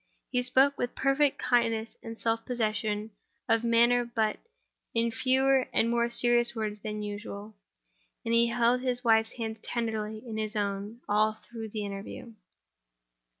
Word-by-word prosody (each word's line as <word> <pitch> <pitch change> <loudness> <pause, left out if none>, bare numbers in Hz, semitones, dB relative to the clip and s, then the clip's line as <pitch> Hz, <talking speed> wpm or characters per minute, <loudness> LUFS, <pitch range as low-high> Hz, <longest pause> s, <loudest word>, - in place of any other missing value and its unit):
He 250 - +1
spoke 265 +3 +3
with 245 - -2
perfect 275 +1 +2
kindness 230 -2 0
and 225 -1 -8
self 225 0 0
possession 215 -2 -1 0.4
of 225 -1 +2
manner—but 235 -1 +2 0.6
in 230 0 +2
fewer 265 +2 +3
and 230 - +2
more 235 0 +1
serious 240 0 +3
words 215 -2 -3
than 210 0 -5
usual; 205 0 -7 0.7
and 230 - 0
he 235 0 +5
held 240 +1 +2
his 250 -1 -2
wife's 225 -1 +3
hand 225 -2 -5
tenderly 220 -1 -3
in 220 -1 -5
his 215 0 -3
own 205 +2 -3
all 215 +1 +3
through 225 0 -9
the 210 0 -4
interview. 200 +4 -7
230 Hz, 145 wpm, -29 LUFS, 215-240 Hz, 0.7 s, he